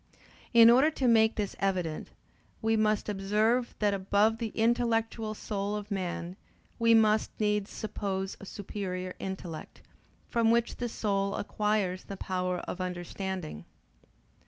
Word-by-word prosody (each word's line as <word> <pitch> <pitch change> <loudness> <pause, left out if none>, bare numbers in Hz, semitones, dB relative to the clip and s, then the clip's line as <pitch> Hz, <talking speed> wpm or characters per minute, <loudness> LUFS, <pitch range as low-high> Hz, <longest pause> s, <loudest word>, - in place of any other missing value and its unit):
In 230 -1 +8
order 265 +6 +6
to 275 -5 -1
make 220 -1 +5
this 205 -2 -2
evident, 180 -5 -1 0.5
we 225 0 +1
must 215 -1 +1
observe 210 +5 +1
that 205 -1 +2
above 205 +3 +2
the 225 -3 -3
intellectual 225 -1 +1
soul 205 -1 -3
of 210 0 -6
man 180 -1 -3 0.4
we 230 0 +5
must 215 -1 +4
needs 210 -1 +1
suppose 195 -2 -3
a - - -10
superior 185 -3 -5
intellect, 185 -4 -7 0.4
from 230 -1 +2
which 235 0 +2
the 240 -1 -2
soul 200 -3 -1
acquires 205 -3 -1
the 195 - -7
power 180 -1 -2
of 185 - -5
understanding. 180 - -4
210 Hz, 135 wpm, -30 LUFS, 190-225 Hz, 0.5 s, In